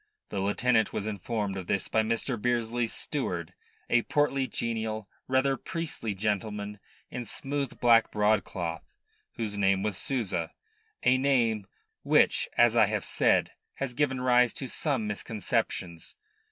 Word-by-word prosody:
The 100 - -3
lieutenant 110 +3 +2
was 100 - -2
informed 105 -1 -2
of 95 -2 -6
this 100 - 0
by 110 - +2
Mr. 115 +3 -1
Bearsley's 120 0 0
steward, 90 - -3 0.3
a 120 - +4
portly, 140 0 +1
genial, 110 -3 -3 0.2
rather 130 +1 +2
priestly 165 - -4
gentleman 105 0 -2 0.3
in 125 - -4
smooth 135 +4 -3
black 115 -2 +5
broadcloth, 100 -6 0 0.5
whose 105 -3 -4
name 95 -1 +3
was 105 -3 -1
Souza 95 -11 -2 0.5
a 130 +1 +4
name 115 -7 +2 0.3
which, - - +3
as 120 -1 +5
I 110 -3 +6
have 105 -1 -2
said, - - +3 0.2
has 135 -2 -3
given 130 -1 0
rise 125 -1 +4
to 135 - -4
some 130 -3 -1
misconceptions. 90 - -3
110 Hz, 135 wpm, -29 LUFS, 100-125 Hz, 0.5 s, I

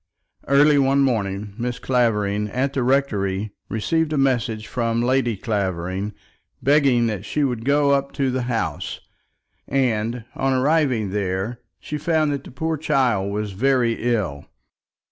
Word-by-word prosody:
Early 145 +1 +5
one 135 +1 +3
morning, 105 -5 -1
Mrs. 120 0 -2
Clavering, 105 -5 +1
at 130 +5 -1
the 135 - 0
rectory, 105 -7 0 0.2
received 160 +8 0
a 155 - 0
message 120 -5 +1
from 115 -1 -1
Lady 125 -3 +1
Clavering, 95 -1 -2 0.4
begging 135 -4 +3
that 110 -4 -2
she 150 - -1
would 125 -5 -1
go 140 +2 +3
up 140 0 +1
to 135 -2 0
the 130 0 -1
house, 115 -2 -2 0.7
and, 120 -3 0
on 135 0 0
arriving 130 -6 +2
there, 100 +4 -2 0.2
she 150 - -5
found 155 -1 +1
that 140 - -4
the - - -11
poor 160 +5 -2
child 125 -10 +1
was 105 0 -3
very 120 +2 +1
ill. 85 -11 -2
120 Hz, 145 wpm, -22 LUFS, 105-140 Hz, 0.7 s, Early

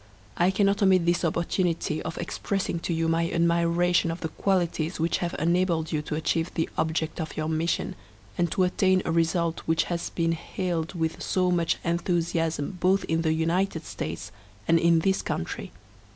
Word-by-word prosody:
I 175 +2 +3
cannot 200 +1 +2
omit 190 -3 +4
this 175 +1 +2
opportunity, 170 -1 0
of - - -5
expressing 180 0 -2
to 170 - -3
you 165 0 0
my 165 +1 +1
admiration 170 0 +2
of 165 +1 -4
the 160 - -2
qualities 175 -3 0
which 165 +1 +1
have 175 0 -2
enabled 170 -1 +1
you 155 - 0
to 150 0 -4
achieve 165 +2 0
the 160 - 0
object 160 +1 -1
of 160 - -6
your 155 0 -1
mission, 160 +1 -1 0.4
and 175 -1 0
to 190 - +2
attain 185 0 +2
a - - 0
result 165 0 +1
which 160 0 +3
has 170 - -3
been 165 -1 0
hailed 165 +1 -3
with 160 -1 -2
so 185 -1 +1
much 170 -2 +1
enthusiasm 170 -1 -1
both 190 +2 +3
in 165 0 0
the 160 -1 +1
United 165 +1 0
States - - -5 0.4
and 165 0 +5
in 170 -1 +4
this 190 +3 +1
country. 80 - -4
170 Hz, 175 wpm, -26 LUFS, 165-180 Hz, 0.4 s, and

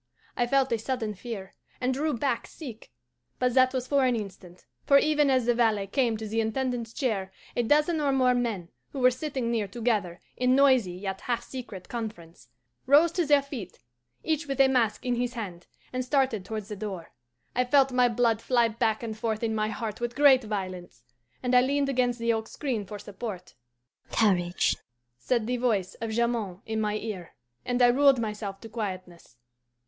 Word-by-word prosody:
I 245 - +1
felt 270 0 +2
a 230 - +1
sudden 225 -2 -2
fear, 200 -2 -7 0.3
and 255 +1 0
drew 295 +2 0
back 245 -1 -1
sick; 245 -8 -10 0.5
but 250 -1 +1
that 255 0 +5
was 255 -2 -2
for 280 +1 +2
an 250 -2 +3
instant, 190 -4 -8 0.2
for 280 - +6
even 300 -1 +3
as 255 -3 +3
the 240 - +3
valet 220 -4 +2
came 230 +2 0
to 220 0 -6
the 225 +2 0
Intendant's 235 0 -2
chair 210 -8 -2 0.2
a - - +2
dozen 300 +6 +2
or 285 -2 +2
more 255 -2 +3
men, 225 -8 -2 0.2
who 275 - -4
were 255 0 +5
sitting 255 -2 -3
near 220 -3 0
together 205 -5 -1 0.2
in 250 +1 +3
noisy 260 -9 +4
yet 190 +1 -5
half 240 -1 -2
secret 230 -9 -8
conference, 190 - -7 0.4
rose 300 +5 +6
to 340 -2 0
their 290 -1 +5
feet, 240 - -8 0.5
each 315 -1 -1
with 275 -1 -3
a 270 - +7
mask 245 -5 +1
in 245 -1 0
his 245 0 -2
hand, 185 -7 -6 0.3
and 255 0 -1
started 260 -6 +1
towards 215 -1 -5
the 210 - -4
door. 195 -5 -6 0.4
I 250 - +3
felt 270 +1 +4
my 250 -1 +4
blood 230 -1 +1
fly 240 -2 +3
back 220 0 0
and 220 -2 -4
forth 220 0 -2
in 225 -1 0
my 215 -1 0
heart 220 0 -5
with 240 0 -2
great 275 -3 +6
violence, 185 - -5 0.4
and 250 0 0
I 250 - +7
leaned 280 +2 +1
against 245 -2 +1
the 230 0 +1
oak 220 0 -3
screen 240 -9 -3
for 210 - -6
support. 200 -2 -7 0.6
'Courage,' 180 -5 +2 0.4
said 235 - 0
the 250 +2 -1
voice 215 -7 0
of 225 - -2
Jamond 220 -5 -1
in 220 0 -2
my 210 -1 0
ear, 210 -5 -6 0.3
and 245 0 -1
I - - +8
ruled 275 +2 +5
myself 210 -3 -4
to 225 - -8
quietness. 185 - -6
235 Hz, 190 wpm, -27 LUFS, 210-255 Hz, 0.6 s, I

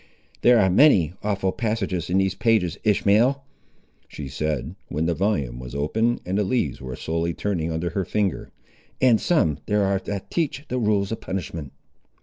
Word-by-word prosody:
"There 120 -1 +6
are 95 - +4
many 95 - +5
awful 100 -2 0
passages 95 -7 -2
in 90 - +2
these 95 -1 +2
pages, 100 -7 +1
Ishmael," 110 +6 +3 0.6
she 70 -3 -8
said, 75 +2 -3
when 75 +3 -2
the 85 - +1
volume 75 - -1
was 60 +1 -8
opened, 110 +12 0
and 95 +3 -1
the - - +2
leaves 95 - -1
were 65 -1 -6
slowly 85 +3 -2
turning 85 -5 -2
under 80 +1 -2
her 95 +3 -1
finger, 100 +1 -1 0.5
"and 125 -4 +4
some 80 - +2
there 105 0 +2
ar' 95 0 +1
that 100 -1 -5
teach 155 -3 -1
the 125 - -1
rules 105 -3 +1
of 115 - -4
punishment." 85 -6 -5
95 Hz, 170 wpm, -24 LUFS, 80-110 Hz, 0.6 s, There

